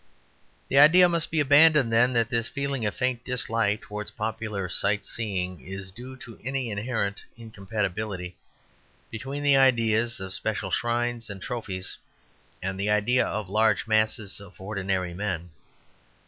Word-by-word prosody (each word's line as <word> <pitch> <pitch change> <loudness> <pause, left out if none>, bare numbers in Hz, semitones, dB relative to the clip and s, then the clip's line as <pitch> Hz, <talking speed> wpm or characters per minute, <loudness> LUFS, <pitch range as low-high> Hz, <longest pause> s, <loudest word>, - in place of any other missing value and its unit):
The 135 - +4
idea 175 +5 +8
must 170 -2 0
be 160 - 0
abandoned, 145 -3 +5
then, 120 +2 +4
that 115 -2 +2
this 115 -1 0
feeling 140 -5 -2
of 105 - -3
faint 125 -1 -1
dislike 115 -4 0
towards 105 0 -6
popular 110 -3 -3
sight 100 +3 +1
seeing 95 - -3
is 95 +2 -7
due 125 +5 -10
to 115 - -12
any 135 -2 -2
inherent 100 -1 -2
incompatibility 100 -4 -4 0.8
between 135 +6 -5
the 140 -1 +5
idea 115 -5 +4 0.2
of 95 0 -6
special 110 +2 -3
shrines 120 0 -1
and 100 -1 -7
trophies 95 -4 -5 0.6
and 95 0 -3
the 100 +1 0
idea 105 +4 +3
of 105 -2 -3
large 110 +3 +2
masses 110 -2 +1
of 100 -1 -14
ordinary 95 -2 -2
men. 90 -3 -3
110 Hz, 145 wpm, -26 LUFS, 100-125 Hz, 0.8 s, idea